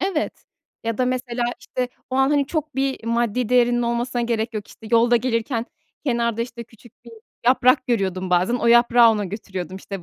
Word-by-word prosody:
Evet, 370 Hz, -5 st, -2 dB, 0.4 s
ya 230 Hz, +1 st, -2 dB
da, 255 Hz, -, +2 dB
mesela, 250 Hz, -1 st, -2 dB, 0.2 s
işte, 250 Hz, -1 st, -3 dB, 0.2 s
o -, -, -3 dB
an, 270 Hz, +1 st, +3 dB
hani, 285 Hz, -2 st, +2 dB
çok 310 Hz, -3 st, -3 dB
bir 270 Hz, -3 st, -1 dB
maddi 235 Hz, 0 st, 0 dB
değerinin 245 Hz, -1 st, +3 dB
olmasına 240 Hz, +1 st, -1 dB
gerek 230 Hz, -1 st, -2 dB
yok, 210 Hz, -1 st, -4 dB
işte, 225 Hz, -, -14 dB
yolda 235 Hz, +1 st, +4 dB
gelirken 230 Hz, 0 st, -1 dB, 0.4 s
kenarda, 235 Hz, -3 st, 0 dB
işte, 235 Hz, -1 st, -8 dB
küçük 225 Hz, 0 st, -19 dB
bir 235 Hz, -, -13 dB, 0.3 s
yaprak 255 Hz, +1 st, +4 dB
görüyordum 190 Hz, -5 st, -1 dB
bazen, 180 Hz, +6 st, +2 dB
o 240 Hz, -, -1 dB
yaprağı 235 Hz, 0 st, +6 dB
ona 210 Hz, -2 st, -1 dB
götürüyordum, 190 Hz, -2 st, -6 dB
işte, 195 Hz, -1 st, -7 dB
235 Hz, 180 wpm, -22 LUFS, 225-250 Hz, 0.4 s, yaprağı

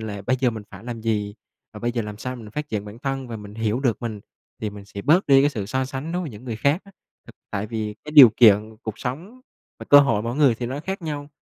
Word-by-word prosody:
là 105 Hz, -2 st, -6 dB
bây 130 Hz, +6 st, +1 dB
giờ 125 Hz, -, +3 dB
mình 110 Hz, -2 st, -7 dB
phải 100 Hz, +2 st, -12 dB
làm 120 Hz, -2 st, -6 dB
gì, 105 Hz, -2 st, -1 dB, 0.4 s
và -, -, -10 dB
bây 120 Hz, 0 st, -1 dB
giờ 115 Hz, -2 st, -1 dB
làm 105 Hz, -1 st, -7 dB
sao 125 Hz, +2 st, -5 dB
mình 110 Hz, -3 st, -10 dB
phát 150 Hz, +6 st, -5 dB
triển 105 Hz, -2 st, -3 dB
bản 105 Hz, +3 st, -10 dB
thân, 135 Hz, -1 st, -3 dB
và 115 Hz, -, -5 dB
mình 105 Hz, -1 st, -10 dB
hiểu 110 Hz, +2 st, -1 dB
được 125 Hz, -3 st, 0 dB
mình 110 Hz, -3 st, -4 dB, 0.4 s
thì 105 Hz, -2 st, -2 dB
mình 100 Hz, -1 st, -11 dB
sẽ 100 Hz, 0 st, -8 dB
bớt 175 Hz, +6 st, +3 dB
đi 135 Hz, -1 st, +6 dB
cái 145 Hz, -, +3 dB
sự 105 Hz, -8 st, -4 dB
so 130 Hz, +4 st, -1 dB
sánh 135 Hz, +5 st, -5 dB
đối 180 Hz, +1 st, -1 dB
với 155 Hz, -, -5 dB
những 105 Hz, +3 st, -12 dB
người 115 Hz, -3 st, -4 dB
khác 140 Hz, -, +1 dB
á. 200 Hz, -, -17 dB, 0.3 s
Thực -, -, -14 dB, 0.2 s
tại 100 Hz, +2 st, -3 dB
vì 110 Hz, -1 st, -4 dB
cái 150 Hz, -, -8 dB
điều 135 Hz, -7 st, +10 dB
kiện 110 Hz, -1 st, +5 dB
cuộc 110 Hz, -1 st, -6 dB
sống, 175 Hz, -, -6 dB, 0.4 s
và -, -, -8 dB
cơ 145 Hz, -, +10 dB
hội 115 Hz, -7 st, +1 dB
mỗi 120 Hz, +2 st, -3 dB
người 140 Hz, -6 st, +4 dB
thì 120 Hz, +1 st, -4 dB
nó 135 Hz, +4 st, -4 dB
khác 190 Hz, +2 st, -5 dB
nhau. 145 Hz, -2 st, -5 dB
120 Hz, 285 wpm, -23 LUFS, 105-140 Hz, 0.4 s, điều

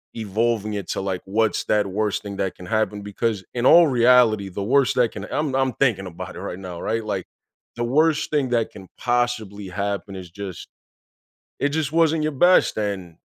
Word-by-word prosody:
evolving 110 Hz, 0 st, -1 dB
it 100 Hz, -3 st, -4 dB
to, -, -, -2 dB
like, 95 Hz, -2 st, -3 dB
what's 110 Hz, +2 st, 0 dB
that 105 Hz, -2 st, +2 dB
worst 105 Hz, +1 st, -1 dB
thing 100 Hz, -1 st, -6 dB
that 95 Hz, -, -2 dB
can 90 Hz, -, -11 dB
happen? 110 Hz, -2 st, 0 dB
Because 105 Hz, 0 st, -2 dB
in 120 Hz, 0 st, -1 dB
all 170 Hz, +3 st, +8 dB
reality, 120 Hz, -5 st, +4 dB
the 100 Hz, +2 st, -5 dB
worst 135 Hz, +4 st, +3 dB
that 120 Hz, -3 st, +3 dB
can 105 Hz, -1 st, -6 dB
I'm 145 Hz, -3 st, -1 dB
I'm 135 Hz, -2 st, +1 dB
thinking 110 Hz, -8 st, +1 dB
about 90 Hz, +1 st, -8 dB
it -, -, -7 dB
right 95 Hz, -2 st, -6 dB
now, 90 Hz, -3 st, -7 dB
right? 115 Hz, 0 st, -1 dB
Like 100 Hz, -4 st, -3 dB, 0.5 s
the 120 Hz, -, -2 dB
worst 155 Hz, +4 st, +2 dB
thing 140 Hz, -4 st, +1 dB
that 115 Hz, -2 st, 0 dB
can 95 Hz, -2 st, -12 dB
possibly 120 Hz, -5 st, -1 dB
happen 100 Hz, 0 st, -3 dB
is 90 Hz, -2 st, -9 dB
just, 100 Hz, -2 st, -7 dB, 0.9 s
it 145 Hz, -, +1 dB
just 150 Hz, -1 st, -1 dB
wasn't 165 Hz, -1 st, +3 dB
your 155 Hz, -, 0 dB
best. 175 Hz, -2 st, +4 dB
And 95 Hz, -5 st, -3 dB
110 Hz, 195 wpm, -23 LUFS, 100-125 Hz, 0.9 s, all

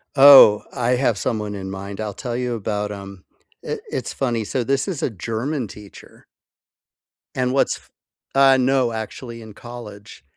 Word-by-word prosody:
Oh, 135 Hz, -7 st, +9 dB
I 120 Hz, 0 st, 0 dB
have 125 Hz, -4 st, +1 dB
someone 105 Hz, -2 st, -2 dB
in 95 Hz, -1 st, -6 dB
mind 100 Hz, +1 st, -7 dB
I'll 105 Hz, -2 st, -4 dB
tell 120 Hz, +2 st, -5 dB
you 125 Hz, -1 st, -2 dB
about 105 Hz, -1 st, -3 dB
'em, 100 Hz, -2 st, -10 dB, 0.4 s
it -, -, -5 dB
it's -, -, -4 dB
funny 120 Hz, -4 st, -1 dB
so 125 Hz, +4 st, -2 dB
this 135 Hz, +2 st, 0 dB
is 180 Hz, -7 st, -4 dB
a -, -, +1 dB
German 115 Hz, -, -3 dB
teacher. 100 Hz, 0 st, -14 dB, 1.1 s
And 125 Hz, 0 st, 0 dB
what's 135 Hz, -, +1 dB
f -, -, -23 dB, 0.5 s
Uh, 135 Hz, -1 st, +6 dB
no 130 Hz, -2 st, +2 dB
actually, 115 Hz, +2 st, -7 dB
in 110 Hz, -1 st, -11 dB
college 105 Hz, -, -11 dB
115 Hz, 160 wpm, -21 LUFS, 105-130 Hz, 1.1 s, Oh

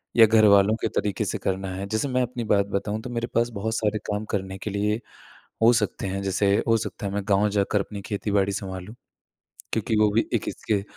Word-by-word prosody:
या 115 Hz, -, +9 dB
घरवालों 105 Hz, -1 st, +5 dB
के -, -, +1 dB
तरीक़े 100 Hz, -3 st, -1 dB
से -, -, -2 dB
करना 95 Hz, 0 st, -2 dB
है। 95 Hz, +1 st, -4 dB
जैसे 110 Hz, +6 st, -1 dB
मैं 130 Hz, 0 st, +1 dB
अपनी 120 Hz, 0 st, -4 dB
बात 100 Hz, -1 st, +3 dB
बताऊँ 105 Hz, +2 st, -2 dB
तो 125 Hz, -, -7 dB
मेरे 120 Hz, -1 st, -2 dB
पास 120 Hz, +1 st, +2 dB
बहुत 110 Hz, +2 st, -2 dB
सारे 105 Hz, -1 st, 0 dB
काम 105 Hz, +1 st, -2 dB
करने 95 Hz, -2 st, -3 dB
के 105 Hz, -, -4 dB
लिए 105 Hz, +2 st, 0 dB, 0.6 s
हो 115 Hz, +2 st, +7 dB
सकते 105 Hz, -4 st, -1 dB
हैं 95 Hz, +1 st, -3 dB
जैसे 100 Hz, +1 st, +2 dB
हो 115 Hz, -, +5 dB
सकता 105 Hz, -1 st, -4 dB
है 100 Hz, -, -3 dB
मैं 100 Hz, 0 st, -1 dB
गाँव 100 Hz, +1 st, +3 dB
जाकर 100 Hz, 0 st, +1 dB
अपनी 100 Hz, +1 st, -5 dB
खेती-बाड़ी 100 Hz, -1 st, 0 dB
संभालूँ। 95 Hz, +1 st, -6 dB, 0.8 s
क्योंकि 110 Hz, -, 0 dB
वो 105 Hz, -, +5 dB
भी 115 Hz, -, +2 dB
एक -, -, 0 dB
इसके 100 Hz, -3 st, -1 dB
105 Hz, 215 wpm, -25 LUFS, 100-110 Hz, 0.8 s, या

